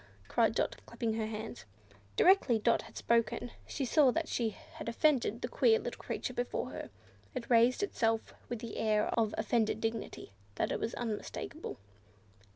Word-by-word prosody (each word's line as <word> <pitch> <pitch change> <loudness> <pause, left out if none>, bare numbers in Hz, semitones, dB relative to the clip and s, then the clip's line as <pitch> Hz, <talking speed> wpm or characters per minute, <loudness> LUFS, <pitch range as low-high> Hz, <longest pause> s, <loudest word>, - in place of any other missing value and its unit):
cried 225 -1 +2
Dot, - - 0
clapping 230 -1 -2
her 220 -1 -1
hands. 220 - -6 0.5
Directly 355 - +5
Dot 230 +2 +3
had - - -12
spoken 235 +1 +1 0.2
she 275 - -2
saw 275 +2 +5
that 320 +5 0
she 230 -2 0
had 215 +2 -8
offended 240 -3 +2
the - - 0
queer 450 -1 +4
little - - -5
creature - - -3
before - - -2
her. - - -6 0.5
It 250 -1 -5
raised 240 - +5
itself 225 - 0 0.2
with 240 -1 -4
an 230 - -5
air 215 -1 +1
of 225 -2 +1
offended 220 0 +1
dignity 225 - -3 0.2
that - - 0
was 230 - -2
unmistakable. 240 +7 -4
230 Hz, 160 wpm, -33 LUFS, 220-255 Hz, 0.5 s, Directly